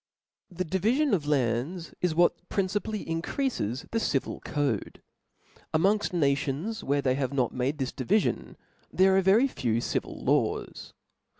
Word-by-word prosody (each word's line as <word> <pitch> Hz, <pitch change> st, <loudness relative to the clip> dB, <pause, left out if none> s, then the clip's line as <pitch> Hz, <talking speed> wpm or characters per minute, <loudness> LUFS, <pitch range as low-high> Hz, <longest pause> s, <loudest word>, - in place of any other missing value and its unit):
'Tp 180 Hz, +1 st, -6 dB
H -, -, +1 dB
E 190 Hz, +3 st, -1 dB, 0.2 s
divifion 285 Hz, -, +1 dB
of 155 Hz, -7 st, 0 dB
lands 140 Hz, +5 st, -1 dB
ia 180 Hz, -, +4 dB
what 175 Hz, +1 st, +2 dB
principally 205 Hz, +2 st, -1 dB
■■" -, -, -16 dB
increafes 160 Hz, -, -2 dB
the 225 Hz, -, +1 dB
civil 140 Hz, -11 st, -1 dB
cods. 140 Hz, -9 st, -2 dB, 0.8 s
Amongfl 195 Hz, +5 st, +2 dB
nations 150 Hz, +6 st, 0 dB
tvhere 140 Hz, 0 st, 0 dB
they 130 Hz, -, +2 dB
have 135 Hz, 0 st, -2 dB
not 130 Hz, -4 st, 0 dB
made 130 Hz, +4 st, -1 dB
this 135 Hz, -3 st, -2 dB
divifion, 145 Hz, -, 0 dB, 0.4 s
there 190 Hz, 0 st, +4 dB
are 195 Hz, -, +5 dB
very 205 Hz, +8 st, +5 dB
few 115 Hz, -, -1 dB
civil -, -, -2 dB
laws. -, -, -1 dB
155 Hz, 155 wpm, -28 LUFS, 135-195 Hz, 0.8 s, are